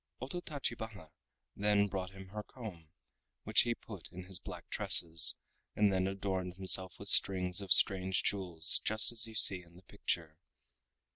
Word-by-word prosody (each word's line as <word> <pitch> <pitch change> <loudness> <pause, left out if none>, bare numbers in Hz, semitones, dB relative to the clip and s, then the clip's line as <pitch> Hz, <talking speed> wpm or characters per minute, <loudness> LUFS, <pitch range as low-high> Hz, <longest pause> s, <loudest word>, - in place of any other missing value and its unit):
Ototachibana 120 - -6 0.4
then 100 0 +1
brought 95 -2 -5
him 95 0 -13
her 105 +2 -6
comb, 100 -10 -11 0.5
which - - +3
he 120 -1 -2
put 100 -7 -11
in 90 +1 -9
his 95 -1 -7
black - - -10
tresses, 80 -2 +4 0.4
and 105 -2 +2
then 95 0 0
adorned 95 -2 -4
himself 95 -1 -1
with - - -10
strings 90 0 +4
of 95 -3 -9
strange 95 -1 +3
jewels 90 -5 +1
just 110 +2 +3
as 115 -1 +3
you 110 - -11
see 95 -3 +5
in 85 -1 -21
the 90 - -17
picture. 80 -3 -5
95 Hz, 155 wpm, -33 LUFS, 90-105 Hz, 0.5 s, see